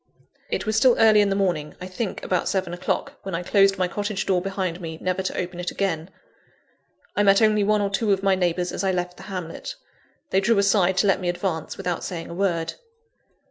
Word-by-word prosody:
It - - -2
was 215 0 0
still 245 +2 +5
early 215 -2 +6
in 205 - +2
the 195 - +1
morning 175 -6 -1
I 180 - -6
think 185 +3 -4
about 180 - 0
seven 185 -3 -1
o'clock 175 - -3
when 195 -3 -4
I 175 - -3
closed 195 +1 +4
my 185 -1 +1
cottage 205 +1 -3
door 185 -2 +2
behind 185 -2 -3
me, 160 -2 -6
never 185 0 -1
to 185 - -3
open 180 -1 -4
it 175 - -2
again. 170 -4 -2 1.1
I - - +2
met 195 -1 +5
only 215 -2 +4
one 210 +1 +2
or 200 -1 -1
two 205 +2 +1
of 195 0 +1
my 195 -1 +4
neighbours 180 -1 0
as - - -3
I 190 - +2
left 180 -1 -3
the - - -11
hamlet. 180 -4 -6 0.6
They 190 - +3
drew 220 +2 +3
aside 195 -2 +3
to 205 - +3
let 195 -1 +3
me 180 - -1
advance, 175 -3 -3
without 180 -3 -3
saying 170 -3 -5
a - - -5
word. 170 -3 0
190 Hz, 220 wpm, -24 LUFS, 180-200 Hz, 1.1 s, early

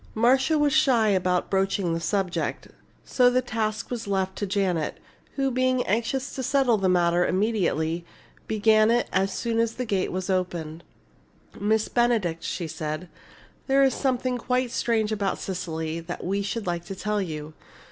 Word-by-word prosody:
Marcia 265 +7 +3
was 295 -1 +2
shy 255 -8 +4
about 180 -2 +1
broaching 195 -2 +1
the 165 - -1
subject, 190 0 -2 0.4
so 250 -1 +4
the 250 +1 +2
task 220 -3 -3
was 235 -3 -4
left 190 -1 -1
to 205 - -3
Janet, 185 -5 0 0.4
who, 270 -1 0
being 255 0 +1
anxious 235 +6 -1
to 265 - -4
settle 260 -3 +2
the 190 -1 +2
matter 175 -1 +3
immediately, 175 -5 0 0.4
began 215 0 +4
it 240 +1 +2
as 190 +1 +2
soon 230 -1 -1
as 230 0 +1
the 250 - -3
gate 195 -4 -1
was 185 0 -3
opened. 170 -4 -2 0.8
"Miss 215 +1 +1
Benedict," 220 -9 +1
she 170 -1 -3
said, 155 +2 -5 0.6
"there 275 0 +4
is 270 - +3
something 255 -2 -1
quite 250 0 0
strange 220 -3 0
about 200 -2 -1
Cecily 160 -3 -4
that 170 +1 -7
we 195 +3 -1
should 210 +2 -3
like 175 -1 -2
to 195 - -6
tell 210 +1 -1
you. 155 -4 -5
205 Hz, 165 wpm, -25 LUFS, 180-240 Hz, 0.8 s, shy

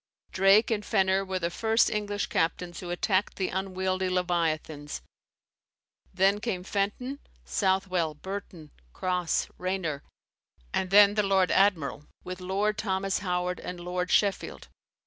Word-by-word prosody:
Drake 195 +4 +5
and 210 -2 0
Fenner 190 -2 +2
were 190 -1 -3
the 170 -1 -2
first 225 +5 +2
English 205 -1 -1
captains 175 +1 -1
who 180 - -7
attacked 185 +3 0
the 190 - -1
unwieldy 185 0 -1
leviathans: 165 -5 -1 1.1
then 195 +2 +3
came 205 -5 -3
Fenton, 210 +8 -2 0.3
Southwell, 180 - 0
Burton, 180 -3 -7 0.2
Cross, 180 -2 -1
Raynor, 180 -6 -2 0.7
and 185 - 0
then 205 +1 +7
the 210 - +2
lord 195 -2 +2
admiral, 170 -7 +2 0.2
with 185 0 -7
Lord 200 +3 0
Thomas 195 -2 -1
Howard 180 -2 -1
and 180 -1 -6
Lord 180 +1 -3
Sheffield. 200 -2 0
190 Hz, 125 wpm, -28 LUFS, 180-200 Hz, 1.1 s, then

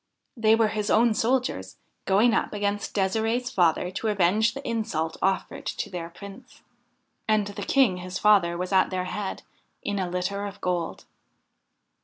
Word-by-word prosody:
They 220 -2 +4
were 225 -1 +3
his 210 0 -2
own 230 +1 +4
soldiers, 225 - -1 0.3
going 215 +5 +4
up - - 0
against 205 0 -2
De'sirde's 225 +5 0
father 175 0 +2
to 220 - -3
avenge 210 +3 +2
the 275 - -6
insult 215 -9 -2
offered 190 -1 -1
to - - -4
their 170 -2 -5
Prince. 200 +8 -13 0.6
And 215 -1 +2
the 205 0 -7
King 220 -3 +3
his 180 +1 -5
father 190 -5 +4
was 180 +2 -4
at 190 -1 +4
their 185 -1 -2
head, 200 +1 -4 0.4
in 205 -1 -2
a 185 -2 -2
litter 190 +3 -2
of 200 0 -9
gold. 175 -2 -2
200 Hz, 160 wpm, -26 LUFS, 180-220 Hz, 0.6 s, They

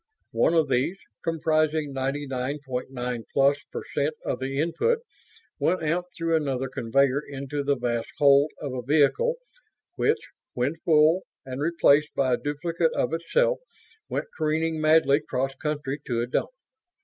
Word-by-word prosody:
One 170 - +2
of 160 -2 +3
these, 135 +8 0 0.3
comprising 155 -2 +1
ninety 135 +2 -2
nine 130 +1 -3
point 125 -1 -4
nine 125 -2 -4
plus 140 +1 +3
percent 150 +2 -2
of 125 - -2
the 135 +1 -3
input, 310 - +1 0.6
went 180 -2 +1
out 170 +3 0
through 165 -1 +1
another 135 -4 -1
conveyor 135 +3 +2
into 140 0 -5
the 140 0 +2
vast 120 -2 -2
hold 140 +1 +5
of 140 -3 -5
a 125 - -3
vehicle 150 - +3 0.6
which, 440 +1 +1 0.3
when 125 +6 0
full 160 +2 +4 0.2
and 130 +1 -5
replaced 150 -2 +3
by 130 -2 +2
a - - +2
duplicate 165 +3 0
of - - 0
itself, - - +1 0.5
went - - -2
careening 160 0 0
madly 155 -2 +5
cross 135 -3 -2
country 150 -2 -3
to 115 -2 0
a - - 0
dump. 125 - -1
145 Hz, 150 wpm, -26 LUFS, 135-160 Hz, 0.6 s, hold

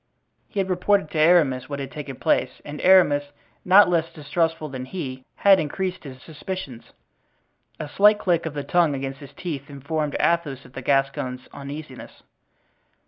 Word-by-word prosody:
He 205 - -5
had 190 - 0
reported 185 -2 +1
to 155 - -2
Aramis 155 -6 +3
what 140 - -4
had 140 -1 -6
taken 145 -3 -7
place, 130 +1 0
and 150 0 -7
Aramis, 175 -6 +5 0.4
not 195 +3 +7
less 165 -2 0
distrustful 160 +1 -2
than 130 -2 -6
he, 130 -5 -6
had 195 -1 +5
increased 185 +4 -3
his 130 -2 -9
suspicions. 155 -5 -7 0.9
A 155 - -4
slight 210 +7 +5
click 170 -5 0
of 150 - -7
the 145 - -3
tongue 170 -4 +2
against 135 0 -5
his 140 -2 -12
teeth 150 -5 -6
informed 145 +2 -3
Athos 150 -6 0
of 125 - -16
the 135 - -6
Gascon's 135 -1 -1
uneasiness. 140 -1 -9
150 Hz, 160 wpm, -23 LUFS, 135-175 Hz, 0.9 s, not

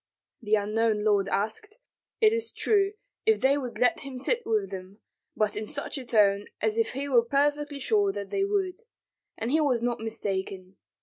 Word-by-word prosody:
The 215 -1 +2
unknown 215 +1 +1
lord 200 -2 +2
asked, 220 - -2 0.4
it 435 0 +6
is 460 0 0
true, 400 -2 +1 0.3
if 440 -1 +4
they 270 +2 +4
would 255 -4 -4
let 250 - +3
him 270 -2 -8
sit 470 - 0
with 210 -4 0
them, 190 +2 -8 0.4
but 215 -1 0
in 215 +1 -4
such 285 +3 -3
a 260 - -8
tone 205 -3 +3
as 220 0 0
if 225 0 0
he 275 +2 -3
were 250 -4 +5
perfectly 290 +3 0
sure 405 - +2
that 200 - -6
they 390 - +1
would; 395 0 -1 0.6
and 230 +3 -2
he 315 +2 +3
was 255 -6 +1
not 240 0 0
mistaken. 190 -4 -4
240 Hz, 185 wpm, -27 LUFS, 210-295 Hz, 0.6 s, it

